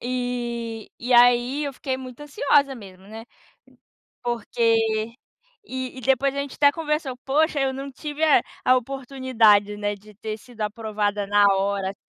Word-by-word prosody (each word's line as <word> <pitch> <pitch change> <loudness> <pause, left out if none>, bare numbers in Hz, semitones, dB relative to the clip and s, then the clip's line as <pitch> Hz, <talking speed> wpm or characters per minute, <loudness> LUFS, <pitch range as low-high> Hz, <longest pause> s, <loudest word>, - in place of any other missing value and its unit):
E 240 -2 -4
e 245 +1 -2
aí, 245 +4 +5
eu 280 - -3
fiquei 260 -1 -3
muito 255 +1 -10
ansiosa 285 -1 +2
mesmo, 190 -4 -13
né, 220 +2 -9 1.0
porque 225 -1 0 0.5
E 260 0 -5
e - - -7
depois 270 +2 +2
a - - -2
gente 280 -1 -4
até 285 -1 +5
conversou: 300 -4 -2
"Poxa, 300 +2 +2
eu 265 -1 +1
não 275 +1 -6
tive 300 +3 -5
a 310 - +6 0.3
a 255 0 +6
oportunidade, 245 -5 +2
né, 205 0 -2
de 210 +1 -17
ter 215 +1 -5
sido 230 0 -13
aprovada 210 -1 -2
na 205 0 +4
hora, 195 0 -1
assim". - - -17
245 Hz, 160 wpm, -24 LUFS, 215-270 Hz, 1.0 s, a